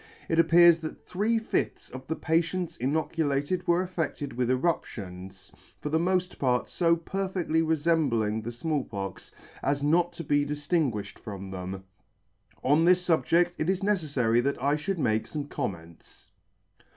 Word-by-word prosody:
It 165 Hz, -, +1 dB
appears 170 Hz, 0 st, +7 dB
that 155 Hz, -1 st, -8 dB
three 215 Hz, +5 st, 0 dB
fifths 225 Hz, -, -2 dB
of 130 Hz, +1 st, -9 dB
the 160 Hz, -, -1 dB
patients 165 Hz, +2 st, 0 dB
inoculated 150 Hz, +4 st, -1 dB
were 175 Hz, +1 st, +3 dB
affedted 165 Hz, -6 st, -3 dB
with 125 Hz, 0 st, -1 dB
eruptions, 95 Hz, -, -3 dB, 0.3 s
for 150 Hz, -, -4 dB
the 160 Hz, +2 st, +2 dB
mod 180 Hz, +1 st, 0 dB
part 125 Hz, -2 st, +1 dB
fo 170 Hz, -1 st, +2 dB
perfectly 180 Hz, -1 st, -1 dB
refembling 145 Hz, -9 st, +1 dB
the 120 Hz, -, -4 dB
Small 145 Hz, +3 st, -1 dB
Pox, 95 Hz, -4 st, -6 dB, 0.3 s
as 140 Hz, +1 st, 0 dB
not 170 Hz, +4 st, +3 dB
to 170 Hz, -, -6 dB
be 145 Hz, -1 st, +2 dB
diftingui'fhed 145 Hz, -, -1 dB
from 100 Hz, -3 st, -7 dB
them. 95 Hz, +1 st, -6 dB, 0.8 s
On 145 Hz, +5 st, +4 dB
this 180 Hz, +1 st, +4 dB
fubjed't 175 Hz, +1 st, +3 dB
it 155 Hz, -, 0 dB
is 190 Hz, 0 st, +1 dB
neceffary 145 Hz, -, +1 dB
that 140 Hz, +3 st, -1 dB
I 140 Hz, +3 st, +1 dB
fhould 180 Hz, +6 st, -2 dB
make 110 Hz, -8 st, +1 dB
fome 145 Hz, -2 st, -5 dB
comments. 85 Hz, -, -7 dB
150 Hz, 150 wpm, -28 LUFS, 125-170 Hz, 0.8 s, appears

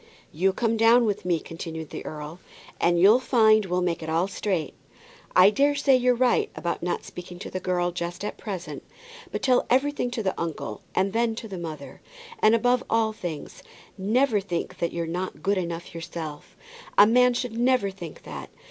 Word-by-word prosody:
"You 185 Hz, +5 st, +2 dB
come 230 Hz, +3 st, 0 dB
down 230 Hz, +2 st, +5 dB
with 205 Hz, -4 st, -2 dB
me," 175 Hz, -2 st, +1 dB
continued 160 Hz, -1 st, -7 dB
the -, -, -6 dB
earl, 155 Hz, +3 st, -7 dB, 0.4 s
"and 170 Hz, 0 st, +3 dB
you'll 205 Hz, +7 st, +7 dB
find 220 Hz, -4 st, +4 dB
we'll 180 Hz, 0 st, 0 dB
make 170 Hz, -2 st, -1 dB
it 160 Hz, -, -5 dB
all 165 Hz, +3 st, +1 dB
straight. 185 Hz, -6 st, -2 dB, 0.6 s
I 185 Hz, +3 st, +8 dB
daresay 280 Hz, +2 st, +3 dB
you're 250 Hz, -1 st, +3 dB
right 250 Hz, 0 st, +2 dB
about 170 Hz, -, -3 dB
not 175 Hz, 0 st, -2 dB
speaking 180 Hz, 0 st, -9 dB
to 190 Hz, -, -8 dB
the 185 Hz, -, -3 dB
girl 175 Hz, -1 st, 0 dB
just 175 Hz, +2 st, -5 dB
at -, -, -4 dB
present. 190 Hz, -5 st, -6 dB, 0.5 s
But -, -, -4 dB
tell 255 Hz, -2 st, +3 dB
everything 265 Hz, 0 st, +1 dB
to 240 Hz, -3 st, -3 dB
the 190 Hz, -, 0 dB
uncle, 155 Hz, -10 st, -4 dB
and 195 Hz, +1 st, +1 dB
then 230 Hz, 0 st, +1 dB
to 225 Hz, -, -7 dB
the 190 Hz, -4 st, -6 dB
mother. 160 Hz, -3 st, -8 dB, 0.4 s
And, 215 Hz, +1 st, +5 dB
above 245 Hz, +2 st, +2 dB
all 225 Hz, -1 st, +2 dB
things, 170 Hz, -8 st, -7 dB, 0.3 s
never 220 Hz, +4 st, +2 dB
think 175 Hz, -4 st, -4 dB
that 170 Hz, -, -1 dB
you're 170 Hz, -1 st, -3 dB
not 180 Hz, +3 st, -4 dB
good 200 Hz, 0 st, +2 dB
enough 170 Hz, -1 st, -5 dB
yourself. 160 Hz, -2 st, -7 dB, 0.4 s
A 205 Hz, -, +9 dB
man 250 Hz, +2 st, +4 dB
should 245 Hz, -2 st, -3 dB
never 240 Hz, -4 st, +2 dB
think 175 Hz, -4 st, -10 dB
that. -, -, -8 dB
195 Hz, 185 wpm, -25 LUFS, 170-230 Hz, 0.6 s, A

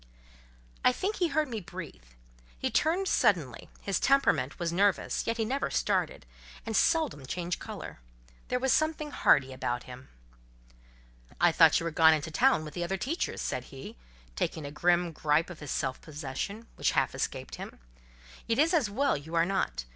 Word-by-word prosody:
I -, -, +6 dB
think 390 Hz, +11 st, -2 dB
he 355 Hz, -, +2 dB
heard 310 Hz, 0 st, 0 dB
me 230 Hz, -4 st, -4 dB
breathe. 175 Hz, -, -9 dB, 0.6 s
He -, -, -2 dB
turned 350 Hz, +5 st, +1 dB
suddenly: 155 Hz, -, +1 dB
his 195 Hz, -2 st, -1 dB
temperament 270 Hz, -, +2 dB
was 170 Hz, -1 st, -2 dB
nervous, 200 Hz, +2 st, +1 dB
yet 230 Hz, +1 st, 0 dB
he 225 Hz, -, 0 dB
never 270 Hz, +5 st, -1 dB
started, -, -, -1 dB, 0.4 s
and 225 Hz, -1 st, -3 dB
seldom 315 Hz, -, +2 dB
changed 175 Hz, +3 st, -3 dB
colour: -, -, -8 dB, 0.5 s
there 250 Hz, -, 0 dB
was 260 Hz, +1 st, +2 dB
something 310 Hz, -1 st, 0 dB
hardy 135 Hz, -, +3 dB
about 120 Hz, -1 st, -3 dB
him. 125 Hz, +1 st, -11 dB, 1.3 s
"I 175 Hz, 0 st, +5 dB
thought 160 Hz, -1 st, +6 dB
you -, -, -5 dB
were 165 Hz, -, -2 dB
gone 160 Hz, 0 st, +6 dB
into 155 Hz, +1 st, -4 dB
town 245 Hz, -, +3 dB
with 150 Hz, -, -8 dB
the 175 Hz, -, -3 dB
other 190 Hz, +3 st, -2 dB
teachers," 285 Hz, -, -2 dB
said -, -, -3 dB
he, 135 Hz, -1 st, -10 dB, 0.4 s
taking 155 Hz, -, -2 dB
a 140 Hz, -, -6 dB
grim 175 Hz, +2 st, +2 dB
gripe 155 Hz, +2 st, +1 dB
of 175 Hz, -, -10 dB
his 150 Hz, -, -8 dB
self 130 Hz, -, -2 dB
possession, 155 Hz, -, -5 dB
which -, -, +1 dB
half -, -, +1 dB
escaped -, -, -4 dB
him—"It -, -, -8 dB
is 320 Hz, +5 st, +3 dB
as 290 Hz, -11 st, +2 dB
well 275 Hz, +7 st, +1 dB
you 155 Hz, +4 st, -6 dB
are 165 Hz, 0 st, +4 dB
not. 120 Hz, -, -1 dB
175 Hz, 175 wpm, -29 LUFS, -, 1.3 s, I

